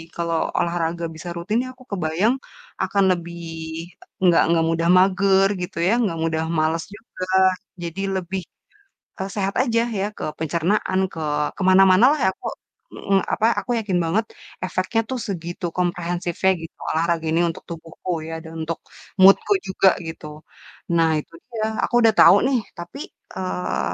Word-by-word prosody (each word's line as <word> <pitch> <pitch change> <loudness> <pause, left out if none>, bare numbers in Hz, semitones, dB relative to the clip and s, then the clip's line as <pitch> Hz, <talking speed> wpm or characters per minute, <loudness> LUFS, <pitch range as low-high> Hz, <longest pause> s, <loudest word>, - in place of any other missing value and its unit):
kalau 170 -1 -1 0.2
olahraga 170 0 -1
bisa 175 +2 -7
rutin 200 +6 -1
nih 255 - -7
aku 255 0 -18
kebayang, 185 +5 +1 0.5
akan 200 -1 +1
lebih 170 0 -8 0.8
enggak 175 -3 +5
enggak 165 -1 +3
mudah 165 +1 +1
mager 195 +1 +4
gitu 180 - -6
ya, 200 - +4
enggak 190 -8 -1
mudah 160 -1 0 0.2
males 160 +1 +1
juga. 210 -4 -8 0.6
Jadi 170 +3 -4
lebih, 190 +1 -3 0.8
eee, 195 - -5
sehat 195 -1 -1
aja 230 -3 +1 0.2
ya, 195 - 0
ke - - -6 0.2
pencernaan, 170 +4 0
ke 165 - -6 0.4
ke - - -6
mana-manalah 195 +9 +6
ya - - +5
aku - - -7 0.5
mhm, 195 -1 +1
apa, 220 - +1
aku 245 - -5
yakin 195 -4 -1
banget 210 +7 +1 0.4
efeknya 185 +5 0
tuh 260 - -2
segitu 175 -2 -5
komprehensifnya 175 +1 0
gitu 165 - -9 0.2
olahraga 165 0 0
ini 165 +2 +2
untuk 165 - -7
tubuhku 165 +2 -7 0.2
ya, - - -5
dan 160 -1 -10
untuk 165 +1 -3 0.4
mood-ku 195 - +7
juga 190 0 +4 0.2
gitu. 160 -1 -8 0.7
Nah 165 -1 +4
itu 150 - -11 0.2
dia, 220 -2 -2 0.2
aku - - 0
udah 225 - +5
tahu - - +9
nih 265 -1 +2 0.2
tapi, 170 +10 -8 0.4
eee, 185 -1 -2
180 Hz, 155 wpm, -22 LUFS, 165-195 Hz, 0.8 s, tahu